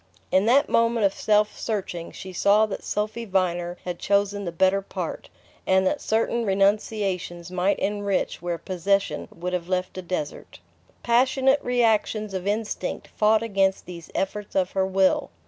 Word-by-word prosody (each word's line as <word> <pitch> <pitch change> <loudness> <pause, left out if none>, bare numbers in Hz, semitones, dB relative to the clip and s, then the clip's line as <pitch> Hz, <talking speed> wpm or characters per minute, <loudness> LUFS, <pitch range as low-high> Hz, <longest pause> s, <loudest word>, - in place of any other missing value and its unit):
In 190 +3 +3
that 275 +5 +5
moment 230 -2 +2
of 195 - +2
self 210 0 +2
searching 185 -6 -4
she 185 0 -9
saw 205 +4 +4
that 210 - -6
Sophy 215 +3 -2
Viner 180 -3 -1
had 180 -1 -4
chosen 200 0 +1
the 170 - -3
better 190 +3 +2
part, 195 - -6 0.4
and 190 0 +4
that 285 - 0
certain 230 +2 0
renunciations 195 -3 0
might 185 +2 +1
enrich 205 -1 -1
where 175 -1 -2
possession 195 +3 -1
would 180 +2 -5
have 180 -1 -3
left 185 0 -2
a - - -4
desert. 175 -5 -5 0.5
Passionate 260 +3 +3
reactions 220 -3 +1
of 190 0 -3
instinct 215 +1 -3
fought 215 +1 +2
against 195 -3 +1
these 170 -2 -10
efforts 205 +1 -3
of 185 -1 +1
her 190 -1 0
will. 190 0 +2
195 Hz, 155 wpm, -25 LUFS, 185-215 Hz, 0.5 s, that